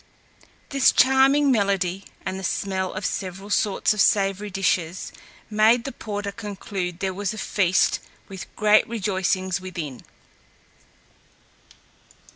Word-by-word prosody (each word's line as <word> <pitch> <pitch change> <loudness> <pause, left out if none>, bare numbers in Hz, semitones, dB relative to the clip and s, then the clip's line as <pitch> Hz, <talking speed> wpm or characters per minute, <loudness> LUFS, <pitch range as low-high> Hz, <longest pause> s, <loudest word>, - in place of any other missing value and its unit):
This 275 -2 +4
charming 270 +2 +4
melody, 195 -4 0 0.2
and 190 - -3
the - - -8
smell 190 0 -2
of 190 0 -5
several 190 +2 -4
sorts 205 +1 +2
of 210 - +1
savoury 200 0 +2
dishes, 185 -2 -1 0.4
made 220 +3 +4
the 275 - -5
porter 205 -4 -5
conclude 195 -4 -5
there 190 -1 -1
was 205 +2 -3
a - - -10
feast, 185 -4 +2 0.3
with 190 -1 -8
great 215 0 +4
rejoicings 190 -4 -1
within. 165 -8 -6
195 Hz, 115 wpm, -24 LUFS, 185-215 Hz, 0.4 s, This